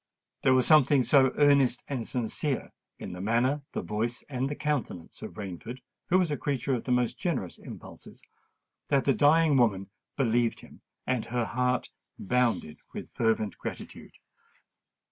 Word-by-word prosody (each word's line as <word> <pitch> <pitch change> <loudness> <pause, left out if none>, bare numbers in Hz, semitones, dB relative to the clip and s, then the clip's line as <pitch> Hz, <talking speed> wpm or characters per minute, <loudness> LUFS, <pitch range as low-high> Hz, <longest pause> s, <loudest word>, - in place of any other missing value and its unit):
There 130 -1 +4
was 130 -1 +4
something 145 -3 +5
so 130 -1 +5
earnest 140 -4 +4
and 130 -5 -4
sincere 125 +3 -2 0.3
in - - -7
the 90 - -7
manner, 120 +7 +1
the - - -3
voice, 115 +3 -2
and 130 -1 -2
the 145 - -3
countenance 145 - -3
of - - -8
Rainford, 105 +5 -7 0.3
who 185 - +4
was 180 -4 +1
a 145 - -1
creature 135 -1 -1
of 120 - -2
the 125 - -2
most 125 -1 +1
generous 130 - -3
impulses, - - -12 0.7
that 140 -2 +3
the 135 - +4
dying 150 0 +4
woman 100 -6 +1 0.3
believed 120 -3 +1
him; - - -16 0.2
and 130 -3 -1
her 120 -1 -1
heart 125 +1 0 0.3
bounded 120 -8 0 0.2
with - - -7
fervent 110 -3 0
gratitude. - - -8
125 Hz, 155 wpm, -28 LUFS, 115-140 Hz, 0.7 s, something